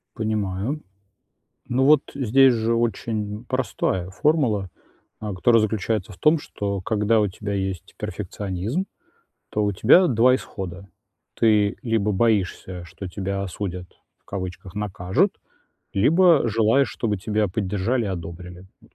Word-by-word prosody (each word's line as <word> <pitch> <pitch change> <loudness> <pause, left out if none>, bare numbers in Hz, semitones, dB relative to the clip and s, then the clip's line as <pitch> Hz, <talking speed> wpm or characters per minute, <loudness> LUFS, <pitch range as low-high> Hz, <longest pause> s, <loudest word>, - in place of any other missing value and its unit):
Понимаю. 110 +5 -2 0.9
Ну, 130 +2 +1
вот 150 0 +6
здесь 135 0 +5
же 115 0 0
очень 110 -1 -2
простая 120 -8 -1
формула, 110 - +1 0.5
э, 105 -2 -4
которая 115 +5 +4
заключается 110 -1 -1
в - - -16
том, 155 - +4
что 100 -8 -4
когда 110 +2 +2
у 105 - +2
тебя 100 +2 -5
есть 95 -3 -4
перфекционизм, 105 - -3 0.6
то 105 - 0
у 105 - +1
тебя 130 - +5
2 125 0 +4
исхода: 95 -5 -7 0.5
ты 105 -2 +3
либо 115 -4 0
боишься, 95 -4 0
что 90 +3 -8
тебя 100 +1 -3
осудят, 90 -1 -5 0.3
в - - -45
кавычках, 95 -1 -6
накажут, 105 - 0 0.6
либо 160 - +4
желаешь, 115 +4 +3
чтобы 105 0 -2
тебя 105 +1 0
поддержали 105 +5 -1
и - - -2
одобрили. 90 0 -7 0.2
М, - - -20
105 Hz, 130 wpm, -23 LUFS, 95-115 Hz, 0.9 s, вот